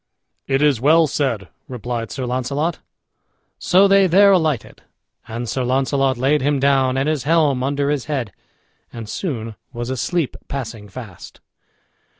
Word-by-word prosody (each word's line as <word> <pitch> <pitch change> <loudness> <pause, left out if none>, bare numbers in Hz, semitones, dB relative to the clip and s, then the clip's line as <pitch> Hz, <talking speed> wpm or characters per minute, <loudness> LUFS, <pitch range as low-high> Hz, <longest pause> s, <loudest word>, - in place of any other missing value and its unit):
"It 135 +1 +1
is 140 -6 +3
well 160 +4 +5
said," 130 -9 -2 0.2
replied 120 -2 -4
Sir 130 - -4
Launcelot. 140 +6 -2 0.8
So 190 +2 +4
they 195 -1 +5
there 200 +3 +6
alighted, 160 - 0 0.5
and 120 +1 -5
Sir 130 +4 -2
Launcelot 135 +1 +1
laid 140 +4 +2
him 140 +1 +1
down, 135 -1 +2
and 135 +2 0
his 155 -3 0
helm 150 -5 +2
under 140 +2 0
his 145 -5 -2
head, 130 -9 -3 0.6
and 115 -2 -8
soon 115 - -4 0.2
was 120 0 -5
asleep 150 +4 -1
passing 115 -6 -6
fast. 100 -5 -11
135 Hz, 145 wpm, -20 LUFS, 120-150 Hz, 0.8 s, there